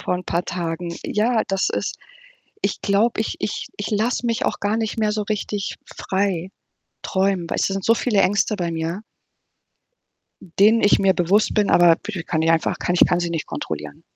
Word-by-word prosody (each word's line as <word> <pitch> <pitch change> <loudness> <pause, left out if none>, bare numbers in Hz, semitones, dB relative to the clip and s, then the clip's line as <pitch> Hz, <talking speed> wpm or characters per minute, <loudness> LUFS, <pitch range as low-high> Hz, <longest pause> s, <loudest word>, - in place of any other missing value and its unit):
vor - - -1
'n 180 0 -5
paar 170 +1 -1
Tagen. 170 -1 -4
Ja, 220 +2 +1
das 195 0 0
ist - - -3 0.6
ich - - -2
glaube, 215 +3 +2
ich 220 - -3
ich 210 - -3
ich 205 - -4
lasse 225 +4 0
mich 230 -1 0
auch - - -2
gar 205 +2 0
nicht 225 0 -2
mehr 215 -1 +1
so 210 0 -1
richtig 205 -1 -3
frei 190 -2 -2 0.5
träumen. 190 -3 0
Weißt - - 0
du? - - -2
Sind 195 -1 -3
so 230 - +5
viele 225 -3 +1
Ängste 205 +3 +2
bei 175 -3 -2
mir 165 +3 -3 1.6
denen 220 +3 +6
ich 205 - +4
mir 195 -1 +4
bewusst 190 +5 +2
bin, 210 -1 +2
aber 175 -1 +6
bi 195 -2 -6
kann 160 -1 -2
ich 165 - +2
einfach 165 0 +1
kann 175 - -1
ich 180 - +6
kann 175 - +1
sie 175 -1 -2
nicht 165 -2 -3
kontrollieren. 75 -1 -6
195 Hz, 195 wpm, -22 LUFS, 175-210 Hz, 1.6 s, denen